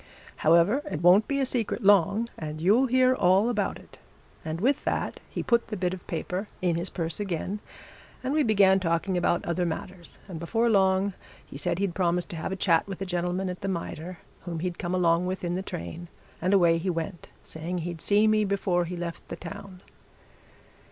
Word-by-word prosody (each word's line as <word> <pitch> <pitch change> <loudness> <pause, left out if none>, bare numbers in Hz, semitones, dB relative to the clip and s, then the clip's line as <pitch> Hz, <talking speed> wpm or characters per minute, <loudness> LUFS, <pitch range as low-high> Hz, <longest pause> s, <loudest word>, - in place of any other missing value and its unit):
However, 170 - +4
it 155 - -4
won't 185 +5 +6
be 280 -1 0
a 270 - +2
secret 240 -6 -2
long, 200 +3 +4
and 155 -1 -6
you'll 215 +11 +4
hear 255 +1 +4
all 195 0 +3
about 210 -5 -1
it.' - - -17 0.4
And 160 +1 -4
with 265 +8 +1
that - - -2
he - - -4
put 235 -1 +2
the 210 - -4
bit 180 -1 -1
of 185 - -9
paper 180 +4 -3
in 180 -3 +1
his 170 +3 -3
purse 165 -1 -3
again, 195 +1 -3 0.6
and 260 +2 -1
we 310 - +3
began 200 -6 +4
talking 170 +1 0
about 175 -1 +1
other 170 +1 0
matters, 175 +1 -5
and 175 -5 -7
before 225 +8 +1
long 190 -1 +3 0.3
he - - -13
said 145 +4 -1
he'd 195 -2 -1
promised 175 -1 0
to - - -6
have 160 - -4
a - - -1
chat 170 -3 +2
with 195 -2 -6
a - - -4
gentleman 180 +1 -1
at 180 0 -5
the 195 - -3
Mitre 175 -1 -4 0.2
whom 170 -3 -5
he'd 180 -1 -3
come 175 +1 -2
along 175 0 +2
with 185 0 -3
in 175 0 -1
the 185 - -1
train, 170 - -7 0.3
and 180 +3 +1
away 170 -4 +4
he 185 +3 -2
went, 170 +1 -4 0.2
saying 165 +3 -5
he'd 170 -1 -5
see 205 +1 +3
me 215 0 +3
before 190 -3 0
be 180 +1 -5
left 170 -1 -6
the - - -5
town." 195 -2 -9
180 Hz, 205 wpm, -27 LUFS, 170-200 Hz, 0.6 s, won't